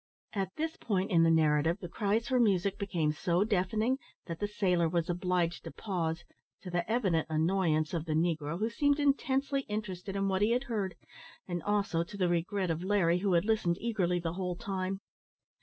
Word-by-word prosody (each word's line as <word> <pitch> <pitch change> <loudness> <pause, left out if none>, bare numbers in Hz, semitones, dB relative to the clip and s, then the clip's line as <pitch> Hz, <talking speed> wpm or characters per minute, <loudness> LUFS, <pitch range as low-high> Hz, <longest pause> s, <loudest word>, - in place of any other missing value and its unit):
At 195 -3 -2
this 320 +1 -3
point 195 -3 -1
in 170 -2 +5
the 165 - +5
narrative, 160 +1 +3
the 180 - -6
cries 215 +5 0
for 255 0 +2
music 200 -3 +2
became 170 -7 0
so 170 +4 +1
deafening, 215 +5 +1 0.3
that 165 -2 -6
the 205 - 0
sailor 180 -5 +1
was 170 +1 0
obliged 175 -1 0
to - - -6
pause, 170 -5 -3 0.4
to 180 - -6
the 175 +2 -1
evident 190 -9 +1
annoyance 160 -1 +1
of 165 -2 -2
the 155 - -1
negro, 160 -1 0
who 220 +4 -1
seemed 285 +4 +2
intensely 275 -1 +1
interested 200 -2 -4
in 195 0 0
what 190 0 0
he 215 +3 +4
had 250 +2 +1
heard; 210 -8 -2 0.5
and, 175 -2 -3
also, 200 -4 +1
to 200 +4 -10
the 180 -3 +2
regret 175 +2 0
of 165 +2 -3
Larry, 185 -3 +2
who 195 0 +1
had 170 +2 +3
listened 210 -6 +1
eagerly 190 -7 0
the 165 -1 -3
whole 180 -1 -2
time. 195 -1 -3
185 Hz, 190 wpm, -31 LUFS, 170-210 Hz, 0.5 s, in